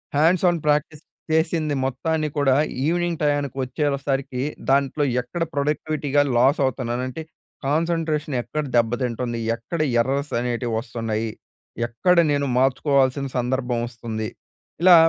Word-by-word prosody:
Hands 165 +5 +4
on 175 - 0
practice 150 0 +1 0.3
చేసింది 160 -1 +1
మొత్తాన్ని 155 +4 -1
కూడా 135 -2 +4 0.3
ఈవినింగ్ 175 0 0
టయానికి 145 -2 0
వచ్చేవసరికి 135 -1 -1 0.3
దాంట్లో 140 +2 +2 0.2
ఎక్కడ 145 +8 -3
ప్రొడక్టివిటీగా 145 0 0 0.2
లాస్ 135 +6 +4
అవుతున్నాను. 125 -1 -2
అంటే 130 +5 -6 0.4
కాన్సంట్రేషన్, 155 -1 0
ఎక్కడ 150 +5 -3
దెబ్బతింటుంది, 120 0 0 0.2
ఎక్కడ 120 +9 -6 0.2
ఎర్రర్స్ 140 +4 -1
అనేటివి 120 -1 -2
వస్తున్నాయి, 115 -2 -3 0.6
ఎక్కడ 150 +10 +2 0.2
నేను 140 -1 +1
మార్చుకోవాల్సిన 135 +1 +2
సందర్భం 125 -1 0
వస్తుంది. 110 -2 -5 0.5
ఇలా 180 0 +8
140 Hz, 110 wpm, -23 LUFS, 125-155 Hz, 0.6 s, ఇలా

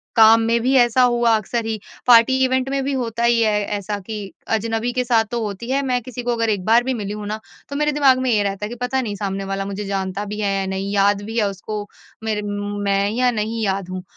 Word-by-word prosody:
काम 225 0 +7
में 230 +1 +2
भी 260 +3 +1
ऐसा 240 +1 +4
हुआ 240 -2 +4
अक्सर 225 +2 -3
ही 220 -1 -3 0.3
पार्टी 240 +2 +6
इवेंट 260 0 0
में 275 0 -1
भी 275 0 -1
होता 235 -3 -2
ही 235 -1 +4
है 210 -2 +2 0.2
ऐसा 205 +1 -4
कि 220 - -4 0.4
अजनबी 225 +2 -2
के 250 -1 0
साथ 230 -2 +2
तो 235 -1 -1
होती 210 +3 -5
है। 275 +1 +2
मैं 250 -1 0
किसी 245 +1 -7
को 245 - 0
अगर 230 -1 0
एक 200 -4 -1
बार 230 +2 +5
भी 260 0 -1
मिली 205 -3 -4
हूँ 210 -1 -6
ना, 215 +1 -3 0.3
तो 280 - -5
मेरे 300 +1 +1
दिमाग़ 275 -3 +4
में 255 -1 0
ये 210 -2 +3
रहता 200 +1 -2
है, - - -6
कि 240 - -6
पता 260 +1 0
नहीं 210 -4 -4
सामने 195 -1 -3
वाला 195 0 -3
मुझे 200 +1 -5
जानता 195 0 -3
भी 210 +1 -6
है 200 -1 0
या 195 - -1
नहीं, 190 +1 -3
याद 200 0 +3
भी 225 +2 -5
है 210 - +3
उसको 205 +2 -6 0.4
मेरे 215 -1 -1
मैं 205 0 -1
या 250 +2 +2
नहीं 220 0 -2
याद 190 -1 -2
हूँ? 185 0 -5
220 Hz, 255 wpm, -21 LUFS, 205-240 Hz, 0.4 s, काम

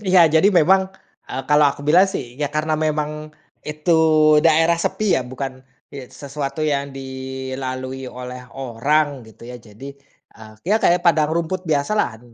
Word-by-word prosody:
Iya, 185 -4 +5
jadi 175 +6 +5
memang, 190 +5 +4 0.5
eee, 135 - -4
kalau 150 0 +5
aku 140 - -9
bilang 180 +6 +5
sih 125 - -6
ya 145 - 0
karena 155 +1 0
memang 150 0 -2 0.4
itu 150 +3 -1 0.5
daerah 165 +1 +4
sepi 200 +4 0
ya, - - 0
bukan 130 +1 -7 0.3
ye 135 -3 -9
sesuatu 140 +1 -6
yang 140 -1 -1
dilalui 130 0 -6
oleh 125 0 -8 0.2
orang 135 +5 +1 0.2
gitu 110 +1 -17
ya. 125 - -8
Jadi, 115 +3 -13 0.5
eee, 110 0 -13
ya 210 - +3
kayak 175 +1 +3
padang 155 -2 +3
rumput 170 +3 -2
biasalah, 140 - 0
145 Hz, 150 wpm, -20 LUFS, 130-160 Hz, 0.5 s, Iya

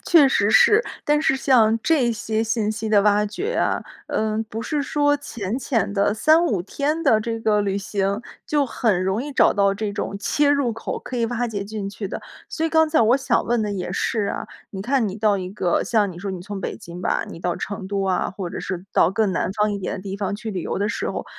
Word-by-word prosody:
确 305 -6 +6
实 205 -5 +2
是。 430 - +6 0.2
但 295 0 +3
是 270 - +3
像 230 -4 +4
这 265 -8 +2
些 220 0 -1
信 220 -1 0
息 220 0 -3
的 210 -2 +4
挖 210 0 +3
掘 395 - -3
啊， - - +1 0.3
嗯， 220 0 -1
不 220 +1 -6
是 295 +3 -1
说 290 0 +2
浅 235 -5 -4
浅 230 -6 -1
的 200 0 +2
3 315 +9 +4
5 200 - 0
天 295 - -2
的 225 -8 +4
这 225 0 -3
个 210 -2 +2
旅 200 -1 -1
行， 200 +1 -1 0.3
就 295 -2 +2
很 220 -7 0
容 190 +4 0
易 290 0 -6
找 - - +4
到 200 -1 +2
这 205 0 -3
种 200 - -3
切 290 +7 +1
入 280 -5 +2
口， 225 - -5
可 255 - -6
以 230 - +1
挖 240 +1 -2
掘 200 -3 -4
进 200 -1 -5
去 205 -1 -5
的。 - - -6 0.3
所 320 - -3
以 325 - +2
刚 320 0 +4
才 310 - +3
我 235 +3 +5
想 265 -3 +1
问 240 -1 +1
的 210 -1 -1
也 185 -2 -4
是 215 -3 -1
啊， - - -4 0.2
你 190 - -6
看 240 0 +1
你 190 - -6
到 210 -2 +2
一 185 -1 -5
个 185 -3 0
像 205 -2 +1
你 170 - -11
说 195 +1 -4
你 185 -2 -5
从 200 +1 -6
北 - - -4
京 170 +1 -10
吧， - - 0
你 165 - -9
到 175 -1 -1
成 195 -2 -5
都 195 -1 -1
啊， 185 -2 0
或 190 -2 -5
者 - - -5
是 185 -1 -5
到 165 - +4
更 200 -1 +1
南 175 - -1
方 210 0 +1
一 200 - -3
点 195 - -3
的 185 - -8
地 195 0 -5
方 200 0 -2
去 220 0 -6
旅 180 -3 -3
游 - - -3
的 205 - 0
时 - - -2
候， - - -4
215 Hz, 260 characters per minute, -22 LUFS, 200-245 Hz, 0.3 s, 确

